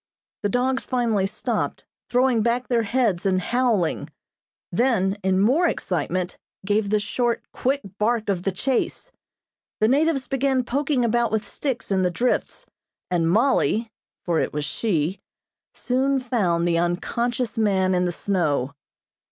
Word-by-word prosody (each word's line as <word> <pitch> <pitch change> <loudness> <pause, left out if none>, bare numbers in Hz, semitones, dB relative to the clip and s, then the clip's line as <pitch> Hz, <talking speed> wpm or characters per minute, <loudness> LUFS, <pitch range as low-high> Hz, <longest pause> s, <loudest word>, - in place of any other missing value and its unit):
The 205 - 0
dogs 255 +4 0
finally 230 -6 +1
stopped, - - -3 0.2
throwing 250 -2 +3
back 235 +3 0
their 240 -2 +3
heads 220 -5 +1
and 190 -1 +2
howling; 225 -4 0 0.6
then, 220 -6 +2
in 190 0 +2
more 270 - +4
excitement, 180 - -2 0.3
gave 205 0 +1
the 210 +1 +2
short, 240 +3 -1
quick 275 +3 0 0.2
bark 220 +1 +1
of 195 -3 0
the 195 - -1
chase. 250 +7 -2 0.7
The 215 - +4
natives 280 +1 +2
began 270 -1 +1
poking 270 0 0
about 235 0 +1
with 220 -1 -1
sticks 260 -7 -4
in 190 -1 +2
the 180 - +2
drifts, 240 +8 -1 0.5
and 165 -2 +2
Mollie 225 +1 +2 0.3
(for 170 -3 +1
it - - -1
was 150 0 -2
she) 180 -3 -1 0.6
soon 265 +2 +1
found 190 -10 0
the 170 -1 +2
unconscious 235 +7 -1
man 190 -3 +2
in 180 0 +2
the 175 - 0
snow. 155 -8 -1
220 Hz, 145 wpm, -23 LUFS, 185-250 Hz, 0.7 s, more